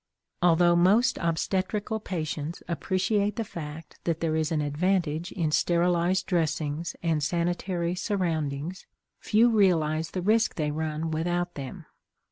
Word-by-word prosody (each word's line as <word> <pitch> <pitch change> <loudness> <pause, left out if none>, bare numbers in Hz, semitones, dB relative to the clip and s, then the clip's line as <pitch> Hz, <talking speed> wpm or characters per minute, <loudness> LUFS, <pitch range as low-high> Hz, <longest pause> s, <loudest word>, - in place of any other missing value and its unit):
Although 175 0 +5
most 210 +8 +4
obstetrical 190 +6 -1
patients 160 -4 -4
appreciate 195 +4 0
the 230 - -1
fact 160 -5 -8
that 165 -2 0
there 160 -1 0
is 160 0 0
an 160 - +1
advantage 165 +2 0
in 165 -5 -1
sterilized 175 +3 +2
dressings 160 -2 -1
and 160 -3 +1
sanitary 175 +2 -1
surroundings, 170 -4 -2 0.3
few 230 +3 +3
realize 165 -7 +2
the 185 - -4
risk 220 +4 +2
they 150 -2 -1
run 155 +1 -2
without 175 +2 -1
them. 135 -3 -7
170 Hz, 125 wpm, -27 LUFS, 155-185 Hz, 0.3 s, Although